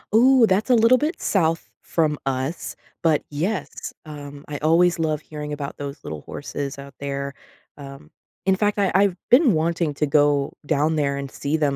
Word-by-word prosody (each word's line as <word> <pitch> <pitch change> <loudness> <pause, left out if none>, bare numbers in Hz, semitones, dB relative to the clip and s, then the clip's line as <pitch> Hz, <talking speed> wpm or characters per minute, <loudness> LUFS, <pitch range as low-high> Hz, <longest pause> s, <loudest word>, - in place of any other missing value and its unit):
Ooh, 255 0 +6
that's 195 +5 +1
a 250 - +6
little 230 +2 +6
bit 300 +6 -2
south 165 -4 +1
from 155 -3 0
us. 135 +5 -3 0.3
But, 160 -3 +3
yes, 175 +8 -3
um, 145 -2 -9
I 145 -1 -4
always 170 +2 +3
love 155 -2 0
hearing 150 -1 -6
about 145 -1 -5
those 140 -1 -7
little 75 -1 -6
horses 140 -1 -5
out 140 0 -10
there, 140 0 -4 0.4
um, 140 +2 -11 0.4
in 190 0 +4
fact, 205 +1 0
I 195 - +2
I've 195 -2 +3
been 255 -1 +6
wanting 165 -1 0
to 150 - +1
go 145 -1 +2
down 155 +2 +1
there 140 -2 0
and 140 -1 -5
see 145 +4 -2
them 145 -3 +1
155 Hz, 180 wpm, -23 LUFS, 140-185 Hz, 0.4 s, Ooh